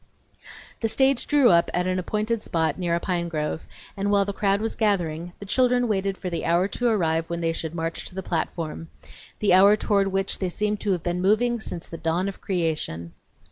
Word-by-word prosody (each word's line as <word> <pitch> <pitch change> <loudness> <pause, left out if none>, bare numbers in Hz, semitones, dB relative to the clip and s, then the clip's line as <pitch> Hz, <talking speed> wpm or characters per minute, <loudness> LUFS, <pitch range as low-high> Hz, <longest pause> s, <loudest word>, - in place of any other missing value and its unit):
The 225 - 0
stage 265 +3 +2
drew 285 -6 +5
up 170 0 +4
at 180 0 +1
an 185 0 0
appointed 215 +4 -1
spot 165 -1 -1
near 170 -2 0
a - - 0
pine 175 -1 -1
grove, 155 0 -2 0.3
and 200 +1 -1
while 200 -1 +3
the 200 - -3
crowd 200 0 +1
was 225 +1 -2
gathering, 175 -5 0
the 200 - -9
children 245 +3 +2
waited 195 -2 -1
for 185 - -6
the 170 - -3
hour 175 +3 +2
to 245 - -1
arrive 165 -6 +1
when 170 0 -3
they 165 0 +1
should 165 0 -5
march 165 0 -3
to 180 - -10
the 190 - -4
platform; 165 -1 -3 0.5
the 205 -3 +2
hour 200 +3 +7
toward 200 -2 +2
which 195 0 -1
they 185 - -1
seemed 210 +3 -1
to 200 - 0
have 175 -2 -3
been 175 0 -1
moving 235 +5 +2
since 175 -5 -5
the 165 - -9
dawn 165 +4 0
of 200 - -6
creation. 155 - -2
185 Hz, 215 wpm, -25 LUFS, 170-210 Hz, 0.5 s, hour